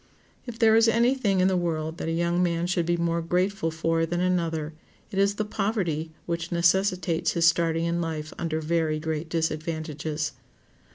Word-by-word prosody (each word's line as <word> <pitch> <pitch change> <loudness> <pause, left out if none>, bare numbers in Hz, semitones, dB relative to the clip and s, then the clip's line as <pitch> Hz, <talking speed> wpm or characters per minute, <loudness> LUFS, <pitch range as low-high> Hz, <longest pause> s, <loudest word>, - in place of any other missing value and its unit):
If 235 -2 -6
there 225 -2 +5
is 225 +1 +5
any 235 +3 +4
thing 205 -8 +1
in 185 - +4
the 190 - +2
world 160 -2 -2
that - - -3
a - - 0
young 170 +1 +1
man 170 -1 +1
should 175 -2 0
be 175 0 +2
more 170 0 0
grateful 180 +1 0
for 165 0 0
than 170 +1 -1
another, 165 -4 0 0.4
it 195 - -2
is 200 +1 +3
the 215 - -2
poverty 195 -7 -1 0.2
which 170 -1 -3
necessitates 175 -1 +2
his 170 -1 +2
starting 165 0 +2
in 170 +1 0
life 155 -2 -4
under 160 -1 -2
very 160 -1 0
great 160 0 -3
disadvantages. 155 -2 -2
170 Hz, 180 wpm, -26 LUFS, 160-185 Hz, 0.4 s, there